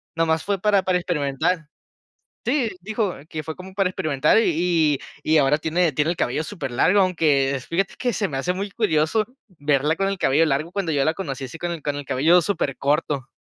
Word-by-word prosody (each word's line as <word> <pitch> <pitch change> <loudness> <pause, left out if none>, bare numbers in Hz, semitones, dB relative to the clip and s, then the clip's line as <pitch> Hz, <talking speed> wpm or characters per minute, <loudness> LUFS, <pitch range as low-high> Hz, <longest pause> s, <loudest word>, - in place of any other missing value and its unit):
nomás 160 -1 +1
fue 200 -2 -1
para 205 -1 +3
para 185 -1 +2
experimentar". 165 0 -1 0.8
Sí, 270 -6 +1
dijo 210 -1 -1 0.2
que 155 -1 -4
fue 160 +1 -6
como 185 +1 -10
para 195 -2 +2
experimentar, 155 -5 +1
y 165 -6 +2 0.3
y 155 - 0
y - - +6
ahora 145 +1 +4
tiene 160 +1 +1
tiene 150 +3 +1
el 175 - -2
cabello 150 +6 0
super 170 -10 -5
largo, 185 +11 +3
aunque 145 -7 +2
fíjate 195 +4 -1
que 245 -2 0
se 205 -2 -1
me 135 - -5
hace 180 +6 0
muy 200 +1 -4
curioso 200 0 +1 0.3
verla 145 +2 +1
con 195 0 0
el 195 -1 -2
cabello 150 +3 +3
largo, 155 +4 -1
cuando 185 -6 -1
yo 140 -2 +2
la 160 - +2
conocí 140 -8 -5
así 130 +5 -8
con 175 0 -3
el 165 - -5
con 145 -1 -2
el 145 - -5
cabello 165 +7 +4
super 155 -7 -1
corto. 140 -1 0
165 Hz, 210 wpm, -23 LUFS, 145-185 Hz, 0.8 s, y